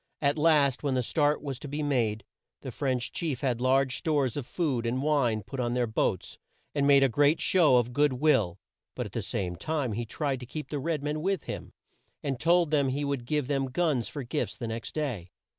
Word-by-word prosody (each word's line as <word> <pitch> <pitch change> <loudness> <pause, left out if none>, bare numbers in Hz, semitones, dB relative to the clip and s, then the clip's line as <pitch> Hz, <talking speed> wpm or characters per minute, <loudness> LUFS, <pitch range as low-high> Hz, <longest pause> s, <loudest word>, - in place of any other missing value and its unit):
At 145 +1 +1
last, 150 -4 +4
when 140 -3 0
the 125 - +1
start 150 +4 +1
was 135 -4 -4
to - - -8
be 145 +2 -3
made, 115 -7 0 0.4
the - - -6
French 130 -3 -2
chief 150 -7 -3
had 125 -3 0
large 130 0 +2
stores 145 -7 0
of 140 -4 -4
food 140 -9 -1
and 130 +3 -1
wine 130 -8 +1
put 130 +7 -7
on 120 -1 0
their 125 -1 +2
boats, 110 -4 -2 0.3
and 140 -1 +1
made 140 -1 +6
a - - +6
great 145 +6 +3
show 165 -8 +4
of 120 0 +2
good 145 0 +3
will, 125 - +2 0.4
but - - -3
at - - -8
the - - -3
same 90 -2 -3
time 145 - -2
he 115 +2 -3
tried 140 +1 -2
to 125 - -9
keep 150 +4 -6
the 145 - -2
red 155 0 -2
men 150 +1 -2
with 190 -1 0
him, - - -6 0.5
and 135 -4 -2
told 170 0 +3
them 145 -3 +3
he 145 +2 -1
would 140 -4 -2
give 150 +1 0
them 135 0 0
guns 135 -3 0
for 145 - -6
gifts 125 +5 -3
the 120 - -5
next 115 +1 -5
day. 125 - -3
140 Hz, 225 wpm, -28 LUFS, 125-150 Hz, 0.5 s, made